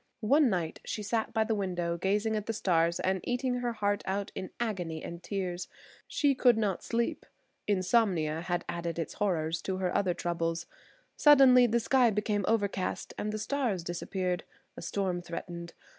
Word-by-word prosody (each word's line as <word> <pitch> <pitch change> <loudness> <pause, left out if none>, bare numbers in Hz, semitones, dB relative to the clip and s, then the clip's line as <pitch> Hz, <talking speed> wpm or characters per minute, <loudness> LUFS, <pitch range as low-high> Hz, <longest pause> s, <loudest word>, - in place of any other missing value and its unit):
One 280 +3 +5
night 175 -5 -2
she 210 - -4
sat 220 +2 -1
by 220 -1 +2
the 220 - -1
window 175 -4 -1
gazing 205 +5 0
at 210 -1 -3
the 225 - -1
stars 170 -3 +2
and 190 0 +1
eating 250 0 -1
her 245 -1 -1
heart 205 -2 0
out 195 +1 -2
in 185 - -5
agony 180 -9 -3
and 170 0 -7
tears. 180 -2 -3 0.4
She 285 -2 +2
could 250 -3 +4
not 205 -5 0
sleep; 235 0 -1 0.4
insomnia 185 -6 +2
had 175 0 -2
added 170 -1 -3
its 165 - -3
horrors 165 -5 0
to 190 -1 -2
her 185 -1 -1
other 185 -3 +2
troubles. 165 -1 -2 0.5
Suddenly 265 -4 +7
the 235 +1 +2
sky 250 +1 +4
became 210 -1 0
overcast 200 -4 -1
and 210 - -3
the 215 - -3
stars 220 -5 -1
disappeared. 180 +1 -2 0.3
A - - -8
storm 180 0 -1
threatened. 170 0 -7
195 Hz, 170 wpm, -30 LUFS, 175-225 Hz, 0.5 s, Suddenly